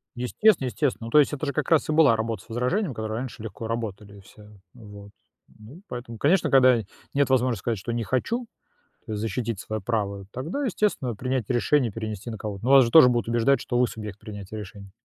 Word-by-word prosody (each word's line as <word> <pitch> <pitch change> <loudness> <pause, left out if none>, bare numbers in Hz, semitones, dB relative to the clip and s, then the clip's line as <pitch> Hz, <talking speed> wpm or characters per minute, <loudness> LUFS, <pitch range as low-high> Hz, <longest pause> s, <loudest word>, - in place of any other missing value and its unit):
Естественно 135 - +2
естественно. 120 0 -2
Ну, - - -6
то 150 - +5
есть, 150 - +4
это 145 +1 -3
же 140 - -1
как - - -2
раз 160 -3 +3
и - - 0
была 150 -7 +5
работа 110 -3 -3
с - - -26
возражением, 125 - -1
которые 110 0 -4
раньше 125 -3 -6
легко 110 +1 -7
работали 105 -3 -5
все, 100 +2 -17 0.3
ну 120 -3 -15
вот. 100 0 -12 0.5
Ну, 115 +11 -13
поэтому, 120 -2 -7
конечно, 170 - +2
когда 130 -3 +6 0.4
нет 140 -1 +2
возможности 125 -4 +2
сказать, 115 -3 -1
что 120 +5 -5
не 115 -1 -2
хочу, 230 - -1 0.6
то 110 - -6
есть 105 - -3
защитить 115 -2 -3
своё 110 0 -4
право, 100 -2 -2
тогда, 155 - -4
естественно, 200 - -1
принять 125 0 -2
решение 125 0 +2
и - - -18
перенести 110 -1 -5
на 110 - -5
кого-то. 105 -1 -6
Ну, 130 - 0
вас 135 -1 +8
же 115 - -2
тоже 140 -1 +8
будут 120 -2 0
убеждать, 120 +4 +2
что 120 - -1
вы 125 - +4
субъект 105 -3 -8
принятия 105 -1 -8
решений. 100 -1 -10
120 Hz, 220 wpm, -25 LUFS, 110-130 Hz, 0.6 s, вас